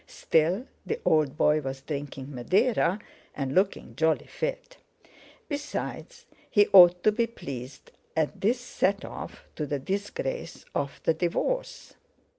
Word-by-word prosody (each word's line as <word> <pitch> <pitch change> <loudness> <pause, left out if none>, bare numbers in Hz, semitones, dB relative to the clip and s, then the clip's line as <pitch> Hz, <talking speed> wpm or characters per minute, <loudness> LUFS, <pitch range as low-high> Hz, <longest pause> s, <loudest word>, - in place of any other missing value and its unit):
Still, 170 +9 +1 0.2
the 450 - -3
old 155 -2 +3
boy 150 0 +3
was 135 -1 -5
drinking 140 -1 -6
Madeira, 190 - +2 0.4
and 135 -2 -2
looking 190 - 0
jolly 160 +3 +2
fit! - - -4 0.7
Besides, 300 +11 -5 0.2
he 205 -2 +5
ought 180 -2 +9
to 215 - +5
be 230 +2 +1
pleased 140 - -8 0.3
at 155 -2 0
this 235 +5 +2
set 200 -5 0
off - - -8
to 150 - -3
the 145 - -1
disgrace 205 - -4
of 140 -2 -3
the 165 - +3
divorce. 185 - -2
180 Hz, 130 wpm, -27 LUFS, 145-245 Hz, 0.7 s, ought